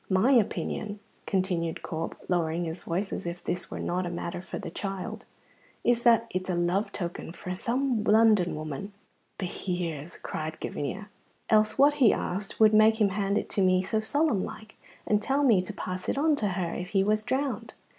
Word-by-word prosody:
"My 190 Hz, +7 st, +4 dB
opinion," 210 Hz, -3 st, 0 dB, 0.3 s
continued 180 Hz, -4 st, -1 dB
Corp, 160 Hz, 0 st, -4 dB
lowering 170 Hz, -1 st, 0 dB
his 165 Hz, +2 st, -5 dB
voice 185 Hz, +4 st, -2 dB
as -, -, -4 dB
if 170 Hz, +1 st, -5 dB
this 180 Hz, +1 st, -3 dB
were -, -, -6 dB
not 180 Hz, 0 st, -1 dB
matter 175 Hz, 0 st, -4 dB
for -, -, -6 dB
the -, -, -6 dB
child, 195 Hz, -2 st, -5 dB, 0.6 s
"is 240 Hz, -1 st, +3 dB
that 230 Hz, -1 st, +6 dB
it's 185 Hz, +1 st, -3 dB
a 180 Hz, -, +1 dB
love 175 Hz, +4 st, 0 dB
token 170 Hz, -3 st, -4 dB
frae 180 Hz, 0 st, -5 dB
some 240 Hz, +3 st, 0 dB
London 215 Hz, -5 st, +4 dB
woman." 155 Hz, +6 st, -5 dB, 0.4 s
"Behear's!" 175 Hz, -4 st, -4 dB
cried 155 Hz, 0 st, -5 dB
Gavinia. 195 Hz, +9 st, -4 dB, 0.4 s
"Else 215 Hz, 0 st, +4 dB
what," 285 Hz, +2 st, +6 dB
he 235 Hz, -, +8 dB
asked, 195 Hz, +2 st, -3 dB
"would 215 Hz, -1 st, +6 dB
make 220 Hz, +1 st, +6 dB
him 210 Hz, -2 st, +4 dB
hand 200 Hz, +1 st, 0 dB
it -, -, -2 dB
to 200 Hz, -, 0 dB
me 185 Hz, 0 st, +4 dB
so 215 Hz, +3 st, 0 dB
solemn 275 Hz, -1 st, +1 dB
like, 220 Hz, 0 st, -9 dB, 0.3 s
and 210 Hz, 0 st, +2 dB
tell 275 Hz, +5 st, +1 dB
me 225 Hz, -9 st, +5 dB
to 180 Hz, -, -5 dB
pass 185 Hz, 0 st, -5 dB
it -, -, 0 dB
on 305 Hz, +1 st, +3 dB
to 210 Hz, -, 0 dB
her 180 Hz, -3 st, -2 dB
if 180 Hz, 0 st, -5 dB
he 190 Hz, -, +5 dB
was 215 Hz, +1 st, +2 dB
drowned? 245 Hz, -1 st, -2 dB
195 Hz, 185 wpm, -28 LUFS, 175-220 Hz, 0.6 s, he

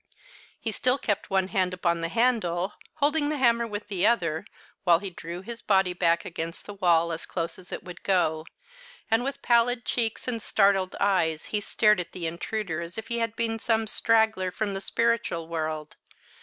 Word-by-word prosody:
He 225 Hz, -, -2 dB
still 250 Hz, +5 st, +1 dB
kept 205 Hz, -6 st, -2 dB
one 190 Hz, -1 st, +1 dB
hand 185 Hz, -3 st, 0 dB
upon 170 Hz, -2 st, 0 dB
the 165 Hz, -, -1 dB
handle, 210 Hz, -5 st, +1 dB, 0.2 s
holding 295 Hz, 0 st, +2 dB
the 305 Hz, -, -1 dB
hammer 235 Hz, -3 st, +3 dB
with 210 Hz, -1 st, -5 dB
the 195 Hz, 0 st, +1 dB
other, 170 Hz, -7 st, +1 dB, 0.4 s
while 175 Hz, -3 st, +6 dB
he 190 Hz, +2 st, -6 dB
drew 170 Hz, +1 st, -7 dB
his 230 Hz, +2 st, -7 dB
body 190 Hz, -3 st, +3 dB
back 170 Hz, -1 st, +2 dB
against 165 Hz, 0 st, -5 dB
the 205 Hz, -, -7 dB
wall 170 Hz, -3 st, +3 dB
as 165 Hz, 0 st, -5 dB
close 165 Hz, -1 st, -4 dB
as 180 Hz, -, -13 dB
it -, -, -5 dB
would 180 Hz, -1 st, -10 dB
go, 160 Hz, -4 st, +1 dB, 0.6 s
and, 225 Hz, +2 st, +3 dB
with 275 Hz, +1 st, -4 dB
pallid 240 Hz, +1 st, +3 dB
cheeks 230 Hz, -1 st, -1 dB
and 235 Hz, -3 st, -1 dB
startled 195 Hz, -3 st, +2 dB
eyes, 180 Hz, -6 st, +1 dB
he 210 Hz, -, +1 dB
stared 210 Hz, -1 st, +3 dB
at 175 Hz, -, -5 dB
the 175 Hz, -2 st, -4 dB
intruder 170 Hz, +1 st, -3 dB
as 170 Hz, +3 st, -7 dB
if 220 Hz, +3 st, -6 dB
he 235 Hz, 0 st, 0 dB
had 230 Hz, -1 st, -1 dB
been 225 Hz, -1 st, -1 dB
some 225 Hz, 0 st, +1 dB
straggler 220 Hz, -3 st, +2 dB
from 200 Hz, +2 st, -2 dB
the 195 Hz, -, -4 dB
spiritual 230 Hz, -7 st, 0 dB
world. 155 Hz, -2 st, -4 dB
195 Hz, 190 wpm, -27 LUFS, 170-230 Hz, 0.6 s, while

